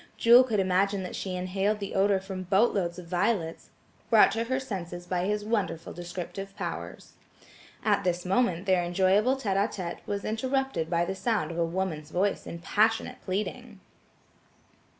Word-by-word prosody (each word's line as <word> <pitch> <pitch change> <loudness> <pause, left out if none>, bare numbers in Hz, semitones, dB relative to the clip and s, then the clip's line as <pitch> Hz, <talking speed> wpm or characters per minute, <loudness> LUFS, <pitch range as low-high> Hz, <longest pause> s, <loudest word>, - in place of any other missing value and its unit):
Jewel 240 +2 +8
could 225 -5 0
imagine 190 +1 +1
that 180 - -6
she 185 -2 -4
inhaled 195 +3 0
the 200 -1 -5
odor 195 0 +3
from 190 -1 -6
boatloads 190 -2 +1
of 180 - -8
violets, 175 -1 -1 0.4
brought 220 -2 +6
to 225 +1 -1
her 260 +2 0
senses 175 -8 -6
by 180 0 -1
his 210 +1 -1
wonderful 195 -7 -2
descriptive 180 +3 -7
powers. - - -6 0.7
At 205 -2 +2
this 180 0 -1
moment 190 -2 +1
their 185 -2 +3
enjoyable 190 +8 +3
tête 205 -8 -1
á 200 +2 +3
tête 175 -3 -5
was 200 0 -3
interrupted 260 -5 -1
by 170 0 +1
the 190 - -2
sound 215 0 -1
of 170 - -4
a 170 - +3
woman's 165 -3 -3
voice 195 +5 0
in 170 - -6
passionate 215 +6 +1
pleading. 210 +3 -4
195 Hz, 165 wpm, -28 LUFS, 180-215 Hz, 0.7 s, Jewel